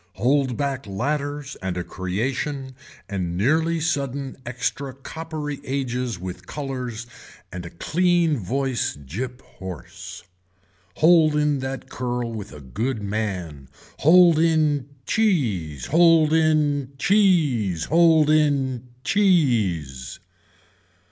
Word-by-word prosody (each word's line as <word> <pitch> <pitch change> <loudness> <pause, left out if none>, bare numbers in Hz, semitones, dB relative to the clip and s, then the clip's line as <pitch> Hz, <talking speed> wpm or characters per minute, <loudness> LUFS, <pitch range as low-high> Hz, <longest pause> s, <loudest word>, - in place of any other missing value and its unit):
Hold 130 +3 +1
back 135 -5 -2
ladders 145 +6 -3
and 95 -1 -3
a 90 - -2
creation 130 +10 -3 0.3
and 90 -4 -3
nearly 160 - +2
sudden 140 -4 -2
extra 130 +2 -3
coppery 150 +1 -6
ages 125 -4 -2
with 90 0 -8
colors 125 -5 -5 0.5
and 90 -1 -6
a - - -8
clean 170 - +1
voice 125 - -1
gyp 115 - -6
hoarse. 95 -3 -9 0.7
Hold 160 -2 +5
in 150 -2 +2
that 130 0 -5
curl 120 -2 -3
with 105 -3 -7
a 75 - -10
good 110 - -3
man. 90 -10 -4 0.3
Hold 170 +1 +6
in 155 -4 +2 0.2
cheese. 110 - 0
Hold 165 -1 +5
in 150 -4 +2
cheese. 145 - +2
Hold 160 -2 +4
in 135 -5 +1 0.2
cheese. 110 - +1
135 Hz, 105 wpm, -23 LUFS, 105-155 Hz, 0.7 s, Hold